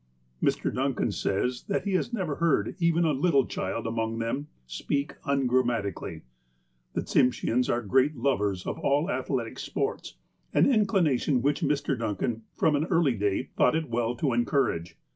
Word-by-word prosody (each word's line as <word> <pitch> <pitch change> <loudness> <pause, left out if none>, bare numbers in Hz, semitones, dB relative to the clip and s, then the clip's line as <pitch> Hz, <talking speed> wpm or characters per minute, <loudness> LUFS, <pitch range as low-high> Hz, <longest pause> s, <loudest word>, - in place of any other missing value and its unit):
Mr. - - +1
Duncan 135 0 0
says 125 +6 -1
that 200 - 0
he 200 - -1
has 185 +6 0
never 185 -11 -2
heard 160 -11 +1
even 170 0 +3
a 160 - +3
little 140 -2 +3
child 95 +5 -3
among 115 0 -2
them 115 +6 -2 0.2
speak 140 - -2
ungrammatically. 120 - 0 0.7
The - - -1
Tsimsheans 125 -1 +2
are 120 0 0
great 130 +8 +2
lovers 105 -8 0
of - - -4
all 145 +6 +1
athletic - - -2
sports, 420 +3 -3 0.4
an - - +6
inclination 175 - +2
which 145 +1 +1
Mr. 145 -1 0
Duncan, 115 0 -2
from 155 - +2
an 145 +2 +1
early 165 -7 +2
day, 105 +3 -1
thought - - +3
it 160 -5 -2
well 120 +1 0
to 130 +1 0
encourage. 115 - 0
130 Hz, 155 wpm, -27 LUFS, 115-155 Hz, 0.7 s, an